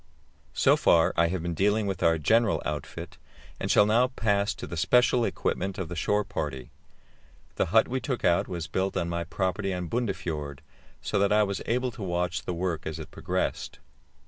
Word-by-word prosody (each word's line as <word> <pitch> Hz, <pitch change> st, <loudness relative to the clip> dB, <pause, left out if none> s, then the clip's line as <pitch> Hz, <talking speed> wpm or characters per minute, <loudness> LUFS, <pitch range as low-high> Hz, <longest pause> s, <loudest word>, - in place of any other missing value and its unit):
So -, -, +5 dB
far 80 Hz, -1 st, +4 dB
I 85 Hz, 0 st, +3 dB
have 85 Hz, 0 st, -3 dB
been 85 Hz, 0 st, -2 dB
dealing 105 Hz, +5 st, +1 dB
with 95 Hz, -2 st, -3 dB
our 85 Hz, 0 st, +4 dB
general 110 Hz, +7 st, +2 dB
outfit, 80 Hz, +2 st, -6 dB, 0.4 s
and -, -, -3 dB
shall 105 Hz, -, +6 dB
now 115 Hz, +4 st, +3 dB
pass 105 Hz, -5 st, 0 dB
to -, -, -7 dB
the -, -, -6 dB
special 125 Hz, +7 st, +3 dB
equipment 95 Hz, -2 st, -2 dB
of 95 Hz, -3 st, -4 dB
the 90 Hz, -, -5 dB
shore 105 Hz, +6 st, +1 dB
party. 75 Hz, -10 st, -5 dB, 0.9 s
The -, -, +1 dB
hut 110 Hz, +5 st, +4 dB
we 130 Hz, +1 st, -2 dB
took 130 Hz, 0 st, -3 dB
out 85 Hz, -, +3 dB
was 85 Hz, -3 st, -4 dB
built 95 Hz, +3 st, -2 dB
on 85 Hz, -1 st, -1 dB
my 85 Hz, 0 st, -2 dB
property 95 Hz, +3 st, -2 dB
on 90 Hz, -2 st, -4 dB
Bundefjord, 80 Hz, -, -3 dB, 0.4 s
so -, -, 0 dB
that 100 Hz, 0 st, +2 dB
I 105 Hz, 0 st, +5 dB
was 100 Hz, -1 st, -2 dB
able 125 Hz, +2 st, 0 dB
to 120 Hz, -2 st, -11 dB
watch 90 Hz, -1 st, -2 dB
the 90 Hz, -, -2 dB
work 85 Hz, -2 st, -2 dB
as 80 Hz, 0 st, -4 dB
it 80 Hz, -3 st, -9 dB
progressed. -, -, -3 dB
95 Hz, 195 wpm, -27 LUFS, 85-105 Hz, 0.9 s, shall